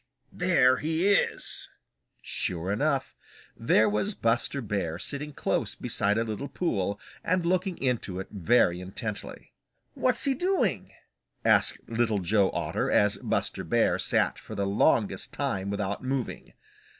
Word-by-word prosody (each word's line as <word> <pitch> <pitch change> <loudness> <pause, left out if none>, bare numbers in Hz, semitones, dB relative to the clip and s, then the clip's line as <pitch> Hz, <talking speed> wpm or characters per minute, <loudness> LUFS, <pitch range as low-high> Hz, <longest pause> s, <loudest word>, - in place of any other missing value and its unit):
There 140 -8 +4
he 160 +5 0
is." 205 - 0 0.5
Sure 90 +1 -2
enough, 140 +5 0 0.4
there 110 -1 +3
was 105 - -1
Buster 115 +4 0
Bear 100 -8 -2
sitting 145 +9 -4
close - - -1
beside 105 +1 0
a 115 - +2
little 110 +5 -4
pool 100 - -2 0.2
and 180 0 +1
looking 185 +1 0
into 120 -8 -1
it 95 - -5
very 90 -2 +2
intently. 100 +3 -6 0.4
"What's 250 -2 +2
he 275 - +3
doing?" 370 +8 0 0.5
asked - - +3
Little 115 -2 +1
Joe 100 +1 +2
Otter, - - -2
as 105 0 +3
Buster - - -1
Bear - - +2
sat - - +1
for - - -9
the 100 - -1
longest 100 +1 +1
time 95 +1 -2
without 100 +2 -3
moving. 130 -1 -3
115 Hz, 135 wpm, -27 LUFS, 100-155 Hz, 0.5 s, There